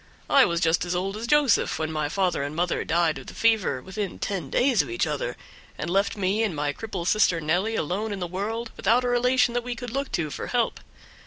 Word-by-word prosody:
I 275 -2 +7
was 170 0 0
just 165 -1 +2
as 175 0 -2
old 195 +3 -2
as 225 +2 -5
Joseph 290 -4 +3
when 160 0 -2
my 155 -2 -1
father 185 -2 0
and 145 +2 -4
mother 175 +2 0
died 165 -1 +1
of - - -13
the - - -9
fever 215 - +2
within 195 0 -4
ten 180 -9 -3
days 245 -7 +3
of 145 - -7
each 115 - 0
other, - - -3 0.4
and 170 - -3
left 200 +3 +1
me 200 +2 +1
and 210 -7 0
my 145 0 -1
cripple 195 -2 -5
sister 185 -3 +3
Nelly 180 +8 0
alone 205 +5 -2
in 200 - -3
the 180 - -2
world, 215 +6 -4
without 235 +5 +2
a - - 0
relation 245 0 +3
that 245 0 -1
we 245 0 -4
could 245 0 -7
look 275 +2 -3
to 155 -3 -1
for - - -5
help. 240 -2 0
195 Hz, 235 wpm, -25 LUFS, 170-230 Hz, 0.4 s, I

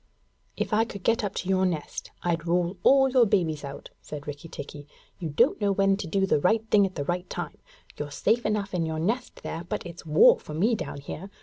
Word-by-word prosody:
'If - - -2
I 220 +1 +4
could 200 -4 -8
get 230 0 +2
up 205 - -3
to - - -3
your 190 0 +2
nest, 170 -5 -2
I'd 170 -1 -1
roll 175 +2 +1
all 270 +4 +6
your 250 -3 +5
babies 170 -8 +1
out!' 140 -1 -8
said 145 -1 -8
Rikki 145 +3 -7
tikki. 145 -1 -9 0.3
'You 165 -4 -3
don't 145 +8 +2
know 200 -1 +2
when 195 0 +3
to 195 - -5
do 195 +3 +1
the 170 - +2
right 220 +7 +2
thing 200 -2 +5
at 185 - -12
the 145 - -3
right 175 +3 -2
time. 175 -4 -5 0.4
You're 145 - -4
safe 225 +11 +1
enough 205 -2 -1
in 170 -3 0
your 160 0 -3
nest 225 +10 -2
there, 165 - -4
but 175 - -4
it's 170 0 -9
war 155 -2 +6
for 150 - -8
me 210 +9 +2
down 145 -9 -4
here. 175 +7 -7
180 Hz, 230 wpm, -27 LUFS, 155-205 Hz, 0.4 s, all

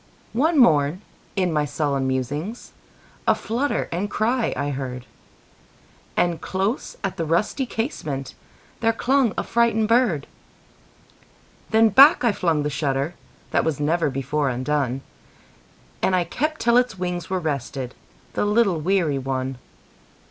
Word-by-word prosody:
One 310 +8 +2
morn, 160 - +4 0.3
in 185 -4 +1
my 150 -1 +2
sullen 140 -2 -1
musings,A 145 - -3
flutter 235 +6 -1
and 185 +5 -2
cry 230 +3 0
I 145 +1 -1
heard; 130 -2 -5 1.1
And 175 -2 +1
close 195 +6 -2
at 195 - -2
the 165 - -1
rusty 210 - 0
casementThere 225 - -4
clung 265 -3 +2
a - - 0
frightened 230 -2 +2
bird. 230 - +2 1.4
Then 220 0 +5
back 275 - +7
I 235 - +4
flung 165 -6 0
the 150 - -1
shutterThat 140 +2 -2
was 160 -3 -1
never 155 +1 +1
before 135 +2 -1
undone, 130 0 -1 1.0
And 185 - +2
I 180 - +2
kept 305 - -2
till 235 +1 +4
its 245 -5 +1
wings 180 -1 -3
were 185 0 0
restedThe 140 -5 -3 0.5
little 205 -5 +2
weary 165 -5 +1
one. 130 -1 -3
175 Hz, 125 wpm, -23 LUFS, 145-225 Hz, 1.4 s, back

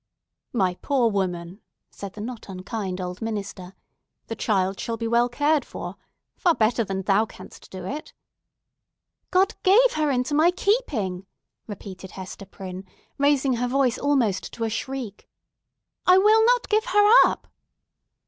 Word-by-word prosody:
"My 190 -6 +1
poor 250 -5 +2
woman," 180 -1 -3 0.3
said 200 -1 -8
the 210 - -8
not 230 -1 -7
unkind 190 0 -5
old 180 0 -5
minister, 200 -4 -5 0.5
"the 225 - -5
child 195 -3 0
shall 230 -1 -3
be 230 0 -3
well 235 +1 +3
cared 290 +4 +1
for—far 345 -3 -4
better 230 0 +2
than 195 -2 -4
thou 205 +3 +2
canst - - -13
do 185 - -8
for - - -6
it." 300 - -6 1.2
"God 380 +4 +3
gave 460 +6 +5
her 305 -1 +1
into 255 +2 0
my 310 +4 +5
keeping!" 275 - -1 0.4
repeated 190 -2 -9
Hester 190 +1 -8
Prynne, 190 -1 -8 0.4
raising 280 -3 +2
her 245 +1 0
voice 255 -1 +1
almost 260 -9 0
to 230 - -4
a 225 - -1
shriek. 250 -3 -5 0.8
"I 365 0 +7
will 430 +3 +5
not - - +3
give 430 +2 +2
her 415 -4 +4 0.2
up!" - - -7
230 Hz, 150 wpm, -24 LUFS, 195-290 Hz, 1.2 s, I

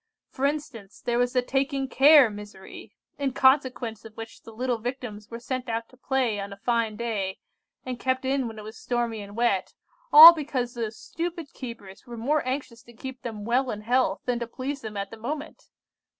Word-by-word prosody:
For 270 - -2
instance, 280 -9 -6
there 240 0 -1
was 245 0 +1
the 250 -1 +2
taking 270 +1 -1
care 275 -2 +6
misery, 205 -2 -11 0.2
in 275 -2 -1
consequence 260 -5 +2
of 220 -1 -13
which 225 0 -9
the 225 - -12
little 245 +1 -2
Victims 235 -3 -6
were 230 - -7
sent 255 +1 -4
out 230 0 -3
to - - -19
play 255 -5 0
on 200 0 -5
a 200 - -9
fine 230 0 0
day, 210 -5 -3 0.5
and 250 -2 -5
kept 260 0 -1
in 265 -1 0
when 225 -1 -8
it 215 - -8
was 215 +1 -10
stormy 235 -3 -2
and 200 0 -10
wet, 230 -6 0 0.4
all 320 +3 +13
because 270 -6 -3
those 225 -2 -4
stupid 335 -3 -5
keepers 230 -7 -9
were 240 -1 -8
more 285 +7 +1
anxious 255 -3 -4
to 235 -1 -17
keep 260 +2 -8
them 215 -3 -6
well 250 +3 +1
in 210 -2 -4
health 250 +4 +1
than 245 -1 0
to 235 - -4
please 265 +4 -5
them 215 -2 -7
at 200 0 -4
the 225 - -9
moment. 290 +7 -6
240 Hz, 200 wpm, -26 LUFS, 225-265 Hz, 0.5 s, all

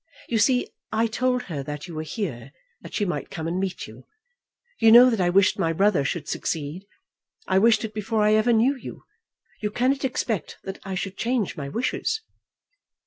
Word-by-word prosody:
You 230 - +1
see, 250 +3 +3 0.2
I 220 +1 +2
told 250 +2 0
her 155 -6 -5
that 150 +4 -6
you 170 - -9
were 155 - -3
here, 150 - -5 0.3
that - - -9
she 205 - +1
might 175 - -3
come 160 -1 -5
and 175 +2 -1
meet 190 -2 -3
you. 110 +4 -14 0.7
You 225 - +6
know 245 +2 +9
that 225 -4 0
I 175 - +2
wished 190 +2 +3
my 165 0 +1
brother 195 -4 +3
should 150 +2 -3
succeed. 160 +5 -4 0.6
I 190 - +3
wished 225 +1 +4
it 215 - -7
before 215 0 -1
I 210 0 +4
ever 215 +3 +3
knew 235 +5 +3
you. 260 - -10 0.6
You 210 - -1
cannot 260 +6 0
expect 230 - -2
that 195 0 -6
I 195 -1 -4
should 195 +1 -4
change 235 -4 -1
my 140 -2 -5
wishes." 260 - -1
205 Hz, 195 wpm, -24 LUFS, 165-230 Hz, 0.7 s, know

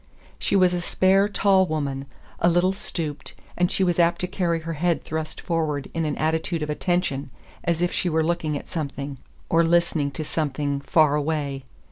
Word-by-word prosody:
She - - 0
was 185 -2 +5
a 175 - -1
spare, 190 +3 +3
tall 195 -2 +3
woman, 140 -3 -2 0.3
a 170 - +4
little 175 +2 +3
stooped, 150 -6 -5 0.2
and 180 0 +1
she 195 - +1
was 175 -2 +1
apt 170 0 +3
to 180 - -1
carry 175 -3 -1
her 165 +1 -4
head 170 +2 0
thrust 155 0 -4
forward 155 -4 -2
in 165 -1 -1
an 150 - -2
attitude 160 +1 0
of 150 - -2
attention, 150 -5 -1 0.3
as 170 0 0
if 175 - +1
she 180 - 0
were 160 -1 +2
looking 155 -2 0
at - - -9
something, 140 -3 -4 0.3
or 165 0 +4
listening 165 -3 +2
to 140 +3 -5
something, 145 -2 -1
far 150 +1 +4
away. 145 -3 -1
160 Hz, 185 wpm, -24 LUFS, 150-175 Hz, 0.3 s, was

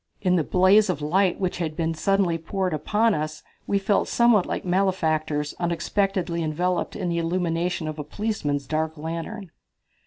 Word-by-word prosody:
In 180 -2 +2
the 165 - +2
blaze 190 +5 +4
of 175 -5 0
light 185 +4 +2
which 185 -2 -2
had 160 -3 -2
been 165 -1 0
suddenly 180 0 +1
poured 185 +2 -2
upon 210 +9 +2
us 155 0 -4 0.2
we 200 - +2
felt 195 +1 +1
somewhat 235 -5 +4
like - - -3
malefactors 160 -5 0
unexpectedly 175 +1 -1
enveloped 175 +3 -1
in 180 - -2
the 170 0 0
illumination 170 0 -1
of 155 0 -5
a - - -3
policeman's 150 -5 -2
dark 160 +1 -2
lantern. 165 +5 -5
175 Hz, 160 wpm, -24 LUFS, 160-195 Hz, 0.2 s, blaze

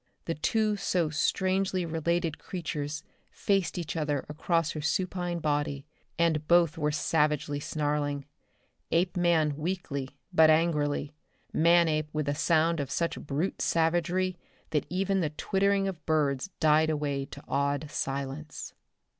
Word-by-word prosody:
The 165 - -1
two 210 +6 +1
so 175 -5 0
strangely 185 +3 +1
related 165 0 -1
creatures 150 -4 -4 0.3
faced 195 -3 0
each 170 -2 -4
other 150 -3 -1
across 165 +1 0
her 155 - -5
supine 175 +2 -1
body 145 -3 -1 0.3
and 160 -2 +1
both 170 -2 +4
were 150 -2 0
savagely 150 -2 +1
snarling. 145 -1 -1 0.7
Apeman 170 -4 +2
weakly 155 -5 -3 0.2
but 160 -2 +7
angrily, 150 -2 +2 0.4
Manape 160 -2 +4
with 155 -1 -1
a 145 - +1
sound 165 +2 +2
of 140 -2 -2
such 165 +3 -1
brute 150 +6 -2
savagery 175 +2 +1 0.3
that 150 - 0
even 195 +2 0
the 155 - 0
twittering 195 +5 +1
of 180 -5 -5
birds 150 0 +1
died 155 0 +4
away 145 -3 -1
to 140 +1 -11
awed 140 +1 0
silence. 140 +2 -4
160 Hz, 130 wpm, -29 LUFS, 150-175 Hz, 0.7 s, but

